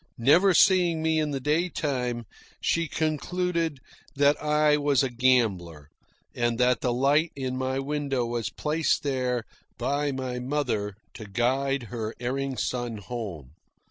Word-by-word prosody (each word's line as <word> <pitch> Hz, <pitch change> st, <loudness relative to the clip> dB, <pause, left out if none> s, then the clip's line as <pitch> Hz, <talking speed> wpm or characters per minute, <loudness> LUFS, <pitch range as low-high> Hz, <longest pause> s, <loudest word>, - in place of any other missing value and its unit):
Never 170 Hz, +10 st, +5 dB
seeing 175 Hz, -4 st, +4 dB
me 160 Hz, 0 st, +2 dB
in 155 Hz, -1 st, 0 dB
the 140 Hz, -2 st, -2 dB
day 155 Hz, +6 st, +1 dB
time, 125 Hz, -7 st, -2 dB, 0.3 s
she 170 Hz, 0 st, 0 dB
concluded 165 Hz, +1 st, -1 dB, 0.4 s
that 145 Hz, +1 st, +4 dB
I 150 Hz, 0 st, +3 dB
was 145 Hz, -2 st, +2 dB
a 130 Hz, -, -1 dB
gambler, 100 Hz, -, +1 dB, 0.4 s
and 120 Hz, -1 st, 0 dB
that 125 Hz, -1 st, +2 dB
the 125 Hz, -, +1 dB
light 140 Hz, +6 st, +2 dB
in 130 Hz, -2 st, -3 dB
my 130 Hz, +1 st, -1 dB
window 135 Hz, -2 st, -1 dB
was 115 Hz, -5 st, -2 dB
placed 155 Hz, -, 0 dB
there 125 Hz, -4 st, -1 dB, 0.3 s
by 140 Hz, +4 st, 0 dB
my 130 Hz, -2 st, -4 dB
mother 125 Hz, -7 st, -2 dB, 0.2 s
to 110 Hz, -3 st, -9 dB
guide 130 Hz, +6 st, 0 dB
her 110 Hz, -1 st, -4 dB
erring 135 Hz, +2 st, -2 dB
son 120 Hz, -3 st, -2 dB
home. 100 Hz, -, -6 dB
130 Hz, 140 wpm, -26 LUFS, 120-150 Hz, 0.4 s, Never